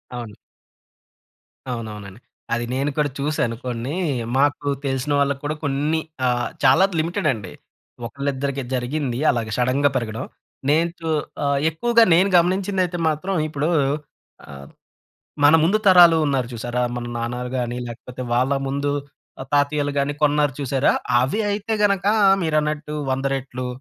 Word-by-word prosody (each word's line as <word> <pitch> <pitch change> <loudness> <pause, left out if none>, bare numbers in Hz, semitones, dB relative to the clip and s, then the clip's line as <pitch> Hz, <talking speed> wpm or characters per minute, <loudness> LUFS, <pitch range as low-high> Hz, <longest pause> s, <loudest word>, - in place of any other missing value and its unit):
అవును. 115 -4 -7 1.3
అవునవునం‌డి. 105 -4 -6 0.3
అది 120 0 -1
నేను 140 +2 0
కూడా 150 -1 +2
చూసాను 140 -5 -1
కొన్ని, 125 +4 -3 0.4
మాకు 145 +1 +1 0.2
తెలిసిన 135 +2 -1
వాళ్ళకి 140 -1 0
కూడా 150 +1 -2
కొన్ని 145 +3 0 0.3
ఆహ్, 120 -1 0
చాలా 135 +8 +6
లిమిటెడ్ 165 0 -1
అండి. 100 -6 -8 0.5
ఒకళ్ళిద్దరికి 140 +1 -3
జరిగింది 125 0 -2
అలాగే 115 -3 -3
సడెన్‌గా 130 +3 +2
పెరగడం. 115 -3 -2 0.4
నేను 165 +3 +3
చు 165 -1 -4 0.3
ఆహ్, 140 -1 +1
ఎక్కువగా 235 +9 +3
నేను 190 +4 +4
గమనించింది 190 +2 +1
అయితే 175 0 -5
మాత్రం 170 +6 -2
ఇప్పుడు 150 +1 -2 0.8
ఆహ్, 70 -1 -10 0.8
మన 145 +2 +7
ముందు 190 +6 +3
తరాలు 175 -3 +8
ఉన్నారు 135 -4 0
చూసారా? 120 +2 -3
మన 120 -1 -4
నాన్నాలు 120 +1 -3
గాని 120 0 -3
లేకపోతే 125 +2 -9
వాళ్ళ 125 +3 +2 0.2
ముందు 140 +1 -1 0.5
ఆహ్, 130 - -8
తాతయ్యలు 145 0 +1
గాని 140 +1 0
కొన్నారు 145 -1 +2
చూసారా? 135 0 +1 0.3
అవి 135 - 0
అయితే 210 +2 -2
గనక 200 -2 +2 0.4
మీరన్నట్టు 150 -1 -1 0.2
100 135 +1 -2
రెట్లు 130 -1 -5
140 Hz, 135 wpm, -22 LUFS, 125-155 Hz, 1.3 s, తరాలు